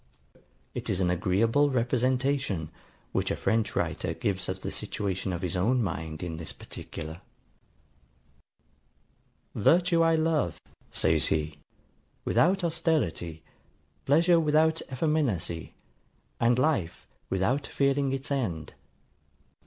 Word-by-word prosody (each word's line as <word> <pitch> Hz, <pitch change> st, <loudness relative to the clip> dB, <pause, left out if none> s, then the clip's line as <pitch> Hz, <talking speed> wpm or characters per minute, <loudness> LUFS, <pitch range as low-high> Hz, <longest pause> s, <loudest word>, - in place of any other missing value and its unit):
It -, -, -4 dB
is 95 Hz, -, +1 dB
an 90 Hz, -2 st, +2 dB
agreeable 110 Hz, +11 st, +2 dB
representation, 125 Hz, -, 0 dB, 0.4 s
which -, -, 0 dB
a -, -, 0 dB
French 110 Hz, -1 st, 0 dB
writer -, -, -1 dB
gives 95 Hz, -2 st, -2 dB
of 95 Hz, 0 st, -4 dB
the -, -, -4 dB
situation 95 Hz, -1 st, -2 dB
of 90 Hz, +1 st, -4 dB
his 90 Hz, 0 st, -1 dB
own 115 Hz, +7 st, +2 dB
mind 80 Hz, -3 st, -4 dB
in 85 Hz, -2 st, -4 dB
this 80 Hz, -3 st, -6 dB
particular, 80 Hz, +1 st, -8 dB, 2.3 s
VIRTUE 170 Hz, -, +4 dB
I 165 Hz, 0 st, +4 dB
LOVE, 155 Hz, -, +1 dB, 0.3 s
says -, -, +2 dB
he, 75 Hz, -1 st, -1 dB, 0.7 s
WITHOUT 190 Hz, +2 st, +3 dB
AUSTERITY: 145 Hz, -, -1 dB, 0.6 s
PLEASURE 170 Hz, +4 st, +5 dB
WITHOUT 160 Hz, +1 st, +3 dB
EFFEMINACY: 130 Hz, -, -1 dB, 0.6 s
AND 120 Hz, +1 st, +3 dB
LIFE, 130 Hz, -, 0 dB, 0.2 s
WITHOUT 120 Hz, +10 st, 0 dB
FEARING 140 Hz, 0 st, +1 dB
ITS 135 Hz, +2 st, -4 dB
END. 95 Hz, -, -2 dB
120 Hz, 110 wpm, -28 LUFS, 90-150 Hz, 2.3 s, PLEASURE